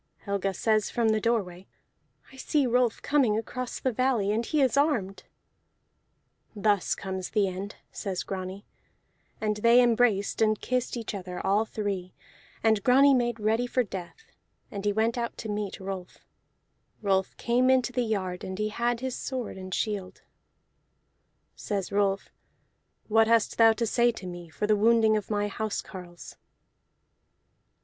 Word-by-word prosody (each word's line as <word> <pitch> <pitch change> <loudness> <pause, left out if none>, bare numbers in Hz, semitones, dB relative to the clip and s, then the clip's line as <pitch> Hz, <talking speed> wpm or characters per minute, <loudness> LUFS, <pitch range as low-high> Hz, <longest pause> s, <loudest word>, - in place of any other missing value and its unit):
Helga 200 -1 -1
says 215 +2 +1
from 230 -2 +1
the 215 0 +1
doorway: 195 -6 -1 0.7
"I - - -13
see 280 +2 0
Rolf 245 -1 +1
coming 260 -8 +2
across 250 +2 -4
the 260 - 0
valley, 240 -4 +1
and 220 +2 0
he 305 +6 -1
is 265 -3 +3
armed." 270 -10 0 1.3
"Thus 205 -2 +1
comes 190 -1 -5
the 205 -2 +2
end," 190 +3 -5 0.2
says 195 -4 -4
Grani, 190 +1 -6 0.7
and 210 -1 -1
they 235 +3 +5
embraced 230 -5 +2
and 215 -1 +3
kissed 250 -1 -2
each 230 -2 -5
other 180 -2 -6
all 205 +3 +2
three, 200 -4 -4 0.5
and 220 -2 +3
Grani 275 +3 +6
made 240 -3 +1
ready 220 +3 +1
for 250 +1 +1
death, 195 - -9 0.4
and 200 0 -6
he 205 - +3
went 225 +3 0
out 235 0 -3
to 220 - -6
meet 205 -1 -3
Rolf. 190 -2 -6 0.9
Rolf 190 -1 0
came 245 +2 +2
into 255 -1 +3
the 250 - +1
yard, 190 -6 -2
and 185 0 -5
he 215 +1 -1
had 235 +2 -1
his 260 -1 -3
sword 255 -4 -4
and 185 0 -8
shield. 195 -1 -3 1.3
Says 200 -3 -3
Rolf: 200 -1 0 0.8
"What 225 0 +4
hast 230 -1 +2
thou 225 -1 +7
to 230 +1 -1
say 240 +2 +3
to 200 - -9
me 175 -2 -8
for 185 - -3
the 210 0 +3
wounding 220 +1 +4
of 210 -2 -3
my 205 -1 0
house 215 +1 -3
carles?" 175 -3 -10
215 Hz, 155 wpm, -27 LUFS, 195-235 Hz, 1.3 s, thou